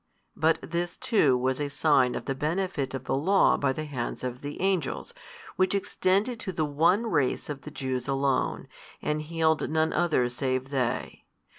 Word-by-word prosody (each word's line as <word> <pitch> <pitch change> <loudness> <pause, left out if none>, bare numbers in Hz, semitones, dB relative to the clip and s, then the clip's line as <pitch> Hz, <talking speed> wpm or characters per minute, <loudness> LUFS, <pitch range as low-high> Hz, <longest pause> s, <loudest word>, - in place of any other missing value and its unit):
But 160 +1 +3
this 170 +1 -3
too 145 - +3
was 130 +2 0
a 145 - -1
sign 140 -4 +3
of - - -5
the 135 - -1
benefit 150 -2 -2
of 130 - -5
the - - -2
law 185 +9 +4
by 140 -2 +1
the 155 +3 -4
hands 130 -5 -4
of 125 +1 -4
Angels, 190 - -2 0.4
which 185 +1 +2
extended 200 +4 0
to 190 - -4
the 160 -3 -1
one 165 +9 +2
race 145 - 0
of 140 -2 -6
the - - -8
Jews 130 -4 -3
alone, 135 0 0 0.4
and 150 0 0
healed 160 0 +1
none 160 +1 +1
other 160 -8 +2
save 130 +1 -2
they. 130 -4 -2
150 Hz, 170 wpm, -27 LUFS, 135-170 Hz, 0.4 s, law